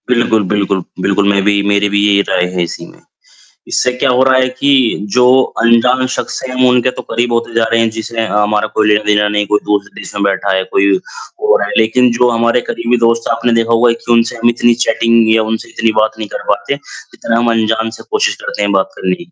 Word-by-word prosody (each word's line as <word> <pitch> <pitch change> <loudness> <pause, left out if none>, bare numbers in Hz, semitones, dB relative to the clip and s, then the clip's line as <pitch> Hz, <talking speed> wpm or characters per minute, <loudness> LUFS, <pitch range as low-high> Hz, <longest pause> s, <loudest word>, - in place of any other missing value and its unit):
बिल्कुल, 120 -3 +1
बिल्कुल, 100 -2 -1 0.2
बिल्कुल, 100 +2 0
मैं 100 -1 +2
भी 100 0 +2
मेरी 100 0 +1
भी 100 0 0
यही 100 -1 +3
राय 90 -1 +1
है 90 -1 -1
इसी 85 - -6
में। - - -21 0.7
इससे 125 - 0
क्या 130 +2 -1
हो 125 +1 +3
रहा 130 0 +3
है 130 0 +2
कि 140 - +2 0.4
जो 125 0 +4 0.4
अनजान 120 +2 +3
शख़्स - - -4
हैं 130 - -5
हम 130 0 +2
उनके 125 0 +2
तो - - -8
करीब 120 +1 -1
होते 115 0 -2
जा 115 - +2
रहे 115 - +2
हैं 115 0 +2
जिसे 115 +1 -4
हमारा 105 +1 0
कोई 110 0 0
लेना-देना 105 0 +2
नहीं, 105 0 -1
कोई 105 +1 +1
दूसरे 100 -1 -2
देश - - -9
में 100 - -2
बैठा 100 0 0
है, 95 - 0
कोई 100 +1 +2 0.6
और 475 +3 +4
है - - -4
लेकिन 120 +2 +3
जो 125 0 +3
हमारे 115 +1 +1
करीबी 120 +1 -1
दोस्त 115 0 0
है, 115 - +1
आपने 115 +1 -1
देखा 115 0 +1
होगा 115 +1 +3
कि 115 +1 -4
उनसे 115 +1 +1
हम 120 0 +1
इतनी 120 0 +2
चैटिंग 115 0 +2
या 110 - +2
उनसे 110 - -4
इतनी 115 0 -1
बात 110 0 -1
नहीं 110 -1 -6
कर - - -6
पाते, - - -1
जितना 115 - -6
हम 120 0 +1
अनजान 110 0 0
से - - -11
कोशिश 435 +2 0
करते - - -5
हैं - - 0
बात - - +1
करने 185 - -2
की। 175 - -23
115 Hz, 235 wpm, -13 LUFS, 105-120 Hz, 0.7 s, जो